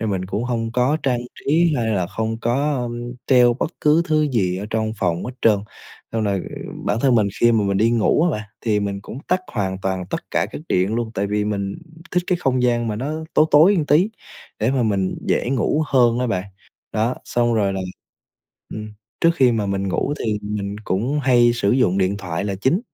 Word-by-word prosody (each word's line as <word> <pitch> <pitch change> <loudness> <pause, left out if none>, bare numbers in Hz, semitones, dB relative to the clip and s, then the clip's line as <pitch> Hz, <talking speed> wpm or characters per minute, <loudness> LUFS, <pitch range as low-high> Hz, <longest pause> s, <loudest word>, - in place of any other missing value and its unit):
Nên 110 -2 -1
mình 95 -1 -2
cũng 105 +4 -2
hông 115 -2 -2
có 125 +5 +2
trang 125 -3 +1 0.2
trí, 165 +3 +2
hay 115 -2 0
là 95 -4 0
không 110 +3 -3
có, 140 +5 +1
ưm, 120 0 -5
treo 125 -2 +5
bất 145 - -2
cứ 150 +3 +4
thứ 155 -1 +3
gì 95 -7 +1
ở 100 +2 -5
trong 110 0 -1
phòng 85 -2 0
hết 125 - -5
trơn. 105 -3 +5 0.5
Xong 110 -1 0
rồi 100 -3 0 0.4
bản 105 +3 0
thân 130 -2 +3
mình, 105 -3 +3
khi 120 0 +5
mà 110 -2 +2
mình 100 0 0
đi 110 +4 +3
ngủ 120 +6 +2
á 175 - +3
bạn, 105 -4 -4
thì 105 -3 +1
mình 100 -1 -3
cũng 110 +5 -9
tắt 180 +1 +2
hoàn 95 -4 -2
toàn 95 -1 -2
tất - - -5
cả - - +1
các - - -6
điện 95 +4 +1
luôn, 115 -1 -2
tại 100 - -1
vì 105 +1 0
mình 100 -2 -2 0.4
thích 180 0 +1
cái 180 -1 +1
không 130 -1 +1
gian 120 -1 +1
mà 105 - -2
nó 140 +6 -3 0.2
tối 155 - +6
tối 165 +8 +6
một 155 -5 0
tí, 175 +9 +3 0.5
để 110 +4 +1
mà 135 -2 +1
mình 100 -4 0
dễ 120 - +1
ngủ 135 +4 +1
hơn 120 -3 +3
á 125 - 0
bạn. 95 -6 -1 0.5
Đó, 115 +4 0
xong 120 -1 +1
rồi 100 -3 +1
là 95 - -3 0.9
ừm, 105 0 -7 0.3
trước 165 - +5
khi 130 -6 +4
mà 105 -3 -1
mình 100 0 -1
ngủ 140 +9 -1
thì 105 -2 0
mình 105 -1 -4
cũng 125 +10 0
hay 120 -2 +4
sử 100 -4 +1
dụng 100 -7 +2
điện 95 +1 +1
thoại 90 -2 -4
là 100 -1 -2
chính, 130 - +1
115 Hz, 225 wpm, -21 LUFS, 100-130 Hz, 0.9 s, tối